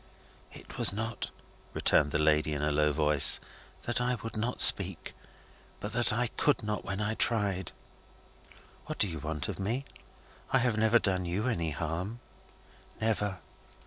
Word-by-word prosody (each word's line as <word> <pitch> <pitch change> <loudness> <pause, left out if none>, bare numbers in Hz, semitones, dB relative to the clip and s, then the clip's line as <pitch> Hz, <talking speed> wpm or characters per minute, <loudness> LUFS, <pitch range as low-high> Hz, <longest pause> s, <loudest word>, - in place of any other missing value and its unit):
"It - - -12
was - - +6
not," 110 +3 -4 0.5
returned 75 - +3
the 75 - 0
lady, 75 0 +2
in 75 0 -3
a 75 - +1
low 75 +1 +2
voice, 75 -1 +4 0.4
"that 120 +1 -2
I 125 +1 +1
would 115 - -6
not 115 +3 -2
speak, 95 -3 +4 0.7
but 105 +1 -6
that 120 -1 +2
I 120 +3 0
could 140 +3 0
not 105 0 -3
when 100 0 -4
I 105 +1 -1
tried." 100 -6 0 1.2
"What - - -5
do 105 - +1
you 80 -4 -5
want 80 +4 -3
of 100 -4 -5
me? 115 +8 -2 0.6
I - - +3
have 120 -3 +1
never 110 +2 +4
done 95 -5 -1
you 90 +6 -2
any 85 -10 -1
harm?" 85 +8 -4 0.8
"Never." 105 -4 -1
100 Hz, 160 wpm, -30 LUFS, 80-115 Hz, 1.2 s, was